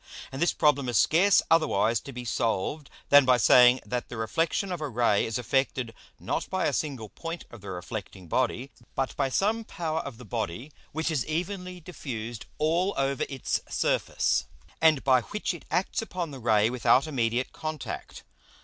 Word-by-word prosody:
And 135 - -6
this 170 - +4
Problem 140 -4 +2
is 120 - +1
scarce 190 +5 +5
otherwise 115 -9 +3
to 140 - -10
be 125 -1 -7
solved, 120 +6 -1 0.2
than 145 0 +8
by 130 -1 +4
saying, 125 +2 +6
that 125 -1 -3
the 120 - -7
Reflexion 165 - 0
of 175 -3 -4
a 150 - -2
Ray 115 -4 +2
is 115 - -2
effected, 125 -1 -1 0.3
not - - -3
by - - 0
a - - +1
single 135 -8 -2
point 165 - -7
of 120 - -11
the 100 - -8
reflecting 95 0 -7
Body, 130 - -1 0.2
but 135 -1 -1
by 135 -2 0
some 215 - +1
power 160 -6 -3
of 140 -7 -6
the 125 - -11
Body 105 - -4 0.2
which 160 +2 -1
is 145 -6 0
evenly 180 +3 -3
diffused 120 - -7
all 170 +6 +1
over 135 -1 0
its 135 -3 -2
Surface, - - +1 0.3
and 160 -4 +4
by 130 -2 +4
which 210 - -3
it 175 - -10
acts 180 +6 0
upon 180 -7 -4
the 135 - -8
Ray 110 -3 +3
without 125 +2 +3
immediate 125 -4 -1
Contact. 155 -2 -6
135 Hz, 175 wpm, -27 LUFS, 120-160 Hz, 0.3 s, than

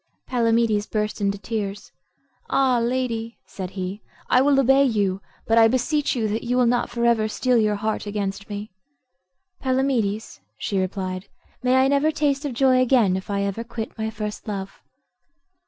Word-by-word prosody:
Palamedes 230 -3 +2
burst 210 0 -2
into 200 0 0
tears. 205 -1 -4 0.6
"Ah, 260 -3 +3
lady," 235 -1 -2
said 185 -2 -6
he, 190 +3 -4 0.3
"I 255 - +6
will 275 0 +4
obey 270 +1 +5
you; 200 -7 0 0.2
but 225 +1 +4
I 225 - +7
beseech 260 +5 0
you 225 -3 0
that 220 +2 -1
you 245 +1 0
will 250 - +4
not 240 +1 +1
for 235 0 -1
ever 230 -2 +3
steel 250 +3 +1
your 210 -1 +2
heart 215 +1 -2
against 200 -1 -3
me." 205 0 -6 0.9
"Palamedes," 255 - 0 0.2
she 195 - -1
replied, 185 0 -3 0.3
"may 255 0 +2
I 260 0 +5
never 280 +2 +3
taste 295 -2 0
of 280 - -2
joy 255 0 +4
again 235 -7 +3
if 190 +2 -5
I 200 -1 0
ever 200 +3 -2
quit 230 -1 -6
my 220 -1 -2
first 210 0 -6
love." 195 -2 -5
225 Hz, 170 wpm, -23 LUFS, 205-255 Hz, 0.9 s, I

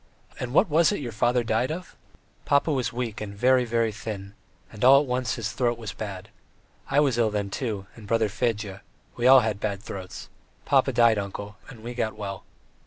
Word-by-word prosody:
"And 125 - -4
what 170 - +4
was 165 +3 +4
it 205 - -2
your 125 -5 -5
father 120 +2 +1
died 115 +4 0
of?" 180 +2 -7 0.5
"Papa 145 +2 +2
was 130 -3 -1
weak 120 -4 -4
and 100 -1 -6
very, 125 +3 +3
very 115 -1 +1
thin, 100 -2 -7 0.4
and 105 - -7
all 135 +2 +8
at - - -3
once 125 -2 -1
his 115 -1 -3
throat 120 -2 0
was 110 -4 -6
bad. 100 -4 -7 0.6
I 140 - +3
was 135 -5 +2
ill 115 -2 +3
then, 100 -2 -3
too, 105 -5 -3
and 110 -3 -12
brother 115 0 +2
Fedya; 105 -2 -2 0.3
we 120 +1 +1
all 130 0 +9
had 110 -3 -2
bad 100 -1 -3
throats. 95 -3 -8 0.4
Papa - - +3
died, 115 -3 +4
uncle, 100 +1 -6
and 115 -4 -12
we 120 +1 -5
got 110 -3 -2
well." 100 -2 -6
115 Hz, 200 wpm, -26 LUFS, 105-125 Hz, 0.6 s, all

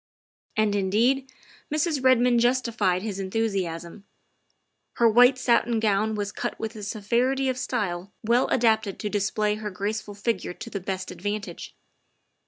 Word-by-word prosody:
" - - -30
And, 215 -1 +2
indeed, 235 +8 +1 0.4
Mrs. 305 -2 0
Redmond 250 -2 +4
justified 235 -7 +1
his 205 -3 -4
enthusiasm. 190 -3 -3 0.9
Her 235 - +4
white 245 +3 +6
satin 235 -2 +2
gown 215 0 +1
was 205 -1 -3
cut - - -4
with 220 0 -4
a 215 - -8
severity 235 +6 0
of 255 - -1
style 185 -5 -2
well 235 +3 +3
adapted 220 -4 +2
to 210 - -3
display 210 +1 0
her 215 -1 -4
graceful 205 +2 -4
figure 205 -3 -2
to 230 0 -8
the 200 - -3
best 190 0 -4
advantage. 205 +3 -5
215 Hz, 145 wpm, -25 LUFS, 200-240 Hz, 0.9 s, white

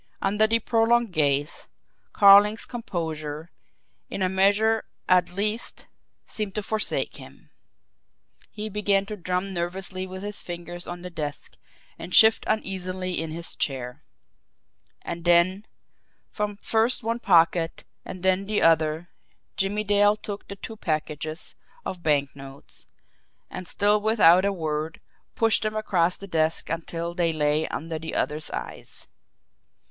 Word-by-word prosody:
Under 210 +2 +2
the 230 +1 +3
prolonged 230 -1 +2
gaze, 145 -1 0 0.4
Carling's 205 +2 +6
composure, 160 - -5 0.6
in 195 - -3
a 185 - +2
measure 205 +4 +2 0.2
at 180 -1 +3
least, 210 +5 -1 0.4
seemed 210 -3 -5
to 210 - -2
forsake 215 +1 0
him. - - -15 1.0
He 215 0 -6
began 200 -1 +1
to 210 - -6
drum 185 0 -3
nervously 185 +2 -4
with 185 +1 -8
his 205 0 -2
fingers 175 0 -6
on 175 0 -7
the 180 - -7
desk, 150 -4 -6 0.4
and 175 +2 -3
shift 220 0 +6
uneasily 185 -4 -2
in 165 - -4
his 165 +2 -7
chair. 125 -3 -3 1.0
And 170 - -6
then, 175 +4 +3 0.6
from 210 -1 -3
first 225 +4 +1
one 230 +1 -1
pocket 165 -4 +3 0.2
and 185 -1 -9
then 190 +1 +1
the 210 0 0
other, 160 +1 +2 0.5
Jimmie 205 +2 0
Dale 205 0 +4
took 205 -1 -7
the 200 - -7
two 220 +3 -9
packages 155 -2 -4 0.3
of 180 - -5
banknotes, 140 -3 -3 0.6
and, 185 - -7
still 205 +3 +2
with 220 +1 0
out 175 +2 +7
a 200 - +2
word, 155 -3 -3 0.4
pushed 225 -1 +3
them 215 0 -2
across 180 -5 +1
the 200 - -9
desk 160 -3 0
until 165 +1 -4
they 170 -2 +1
lay 150 0 +1
under 160 0 -5
the 160 +1 -6
other's 150 0 -1
eyes. - - -7
185 Hz, 135 wpm, -25 LUFS, 165-210 Hz, 1.0 s, out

